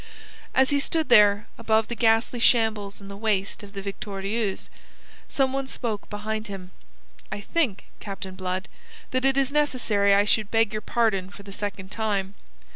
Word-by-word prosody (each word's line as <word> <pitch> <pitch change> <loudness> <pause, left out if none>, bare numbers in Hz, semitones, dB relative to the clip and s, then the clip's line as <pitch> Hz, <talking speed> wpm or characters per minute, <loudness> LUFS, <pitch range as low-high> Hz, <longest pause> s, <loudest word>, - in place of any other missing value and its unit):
As 265 +2 +4
he 285 - +3
stood 315 0 0
there, 210 -2 +6
above 220 -1 +2
the - - -4
ghastly 225 +1 +2
shambles 220 -4 +2
in 200 - -10
the 200 - -8
waist 200 -2 -1
of 205 -1 -12
the 195 -1 -6
Victorieuse, 200 +1 -3 0.6
some 265 -1 +1
one 270 0 -2
spoke 225 -6 -4
behind 215 +1 -4
him. 190 -2 -8 0.6
"I - - -3
think, 225 - -1
Captain 195 -2 -6
Blood, 185 0 -3 0.4
that 255 +1 +1
it 270 0 +3
is 275 0 +2
necessary 235 -9 +2
I 200 +1 +4
should 215 -1 +2
beg 225 -1 +2
your 215 - -2
pardon 215 -5 +1
for 200 0 -12
the 200 - -10
second 195 -1 -4
time. 205 -3 -1
210 Hz, 170 wpm, -25 LUFS, 200-235 Hz, 0.6 s, there